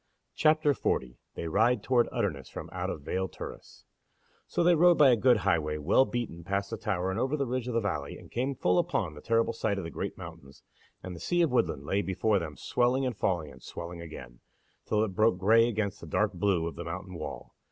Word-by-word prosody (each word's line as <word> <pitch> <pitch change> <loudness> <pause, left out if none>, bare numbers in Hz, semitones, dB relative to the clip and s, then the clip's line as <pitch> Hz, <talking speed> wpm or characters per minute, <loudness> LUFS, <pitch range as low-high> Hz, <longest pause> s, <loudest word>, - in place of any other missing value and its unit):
CHAPTER 155 -1 +3
40 60 - -2 0.2
They 85 - -4
Ride 115 +9 +2
Toward 125 -2 +2
Utterness 70 -1 -2
From - - -8
Out - - -2
of 75 - -5
Vale 95 +5 -1
Turris - - -10 0.6
So - - 0
they 175 +1 +6
rode 175 +1 +5
by 140 -3 +7
a - - +5
good 125 +1 +4
highway, 80 -6 0
well 95 - +4
beaten, 120 -10 -4
past 100 +2 -2
the - - -3
Tower 95 -4 -1
and 95 - -2
over 135 +4 0
the 140 - 0
ridge 125 0 -2
of 125 - -3
the 115 - +2
valley, 75 -9 -3
and - - -15
came 130 +3 -1
full 90 -6 +2
upon 75 - -1
the 75 - -11
terrible 115 0 +1
sight 110 -3 -1
of 95 - -3
the 80 - -6
Great - - -4
Mountains, 70 +1 -11 0.4
and 90 -1 -6
the - - -9
sea 175 - +1
of 160 - +1
woodland 75 - +1
lay 100 +6 +1
before 100 +2 +1
them, 80 -3 -6
swelling 125 +2 +1
and 125 -3 -2
falling, 85 -7 -1
and 65 - -15
swelling 85 0 -7
again, 60 -7 -10 0.5
till 105 0 +2
it 110 - -1
broke 110 +1 +2
grey 115 +5 +5
against 105 -3 -2
the 85 - -9
dark 105 +6 +1
blue 90 -2 +1
of 85 - -4
the 85 - -4
mountain 90 +3 -6
wall. 85 - -7
100 Hz, 225 wpm, -29 LUFS, 85-120 Hz, 0.6 s, by